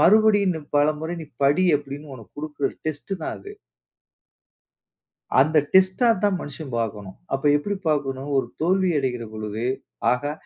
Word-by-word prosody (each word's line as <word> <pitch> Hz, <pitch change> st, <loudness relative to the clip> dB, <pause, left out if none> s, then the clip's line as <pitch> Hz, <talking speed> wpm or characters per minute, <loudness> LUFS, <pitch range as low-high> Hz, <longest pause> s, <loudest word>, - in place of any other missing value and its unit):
மறுபடியும் 200 Hz, -7 st, +4 dB
பலமுறை 155 Hz, +3 st, +1 dB
நீ -, -, -9 dB, 0.2 s
படி" 145 Hz, +7 st, +4 dB
அப்பிடின்னு 145 Hz, 0 st, -8 dB
உனக்கு 115 Hz, -4 st, -15 dB
குடுக்கிற 150 Hz, -2 st, -2 dB
டெஸ்ட் 155 Hz, +5 st, -4 dB
தான் -, -, -3 dB
அது. 405 Hz, +1 st, -10 dB, 1.9 s
அந்த 155 Hz, +4 st, +4 dB, 0.2 s
டெஸ்ட்டா 190 Hz, +5 st, +5 dB, 0.2 s
தான் 205 Hz, -2 st, +3 dB
மனிஷன் 145 Hz, -1 st, -7 dB
பார்க்கணும். 105 Hz, -4 st, -4 dB, 0.2 s
அப்ப 135 Hz, -, -1 dB
எப்பிடி 200 Hz, +7 st, -3 dB
பார்க்கணும்? 135 Hz, -2 st, -1 dB
ஒரு 130 Hz, -, +1 dB
தோல்வி 185 Hz, +2 st, +2 dB
அடைகிறபொழுது, 115 Hz, -4 st, -3 dB, 0.5 s
ஆஹா! 145 Hz, +4 st, 0 dB
145 Hz, 125 wpm, -24 LUFS, 135-185 Hz, 1.9 s, டெஸ்ட்டா